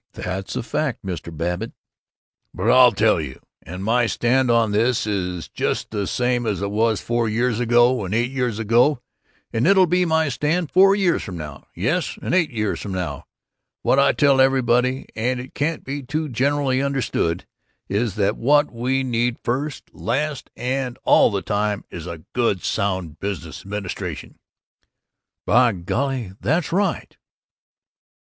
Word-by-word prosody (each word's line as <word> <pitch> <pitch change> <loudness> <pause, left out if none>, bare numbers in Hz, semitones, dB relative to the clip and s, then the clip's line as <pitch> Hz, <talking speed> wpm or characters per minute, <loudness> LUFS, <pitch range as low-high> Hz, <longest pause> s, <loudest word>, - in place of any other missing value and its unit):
"That's 95 +2 -5
a - - -2
fact, 130 -2 -2
Mr. 90 -2 -5
Babbitt." 85 +3 -3 0.8
"But - - +1
I'll 125 -1 +7
tell 110 -6 +2
you 65 -3 -7 0.2
and 90 +3 -8
my 115 +3 +2
stand 125 +3 +1
on 115 -2 +3
this 115 +3 +1
is 90 -5 -3
just - - -2
the 100 -3 -2
same 125 -1 0
as 105 -3 -1
it 100 - -2
was 110 0 +1
four 120 -1 -1
years 115 +1 0
ago, 120 0 +3
and 95 - -5
eight 120 +2 +1
years 125 -5 -1
ago, 120 +5 +3 0.5
and 115 +5 +1
it'll 190 -1 +6
be 180 +1 +2
my 160 -1 +2
stand 150 +5 -1
four 195 +2 +6
years 190 -4 +1
from 90 -4 -7
now 75 -3 -8
yes, - - -1
and - - -3
eight 180 -4 +3
years 110 -4 -2
from 100 - -5
now! 90 -6 -4 0.6
What 135 - +3
I 140 - +5
tell 140 -2 +4
everybody, 130 0 +2
and 125 +3 -1
it 130 +2 -9
can't 155 +3 -2
be 140 +2 -4
too 155 +4 -3
generally 135 +1 +1
understood, 135 -11 -1 0.4
is 105 0 -1
that 105 +1 +1
what 145 +4 +3
we 130 +3 0
need 120 -1 0
first, 140 +5 -3
last, 140 +4 -2
and 130 0 -2
all - - +5
the 100 -3 -2
time 105 0 -1
is 85 0 -7
a 85 -2 -7
good, 115 -6 0
sound 95 -6 -2
business 100 -6 -5
administration!" 100 -2 -6 1.1
"By 120 0 +4
golly, 120 +5 -2
that's 160 +3 0
right!" 195 +3 -1
120 Hz, 160 wpm, -22 LUFS, 100-135 Hz, 1.1 s, I'll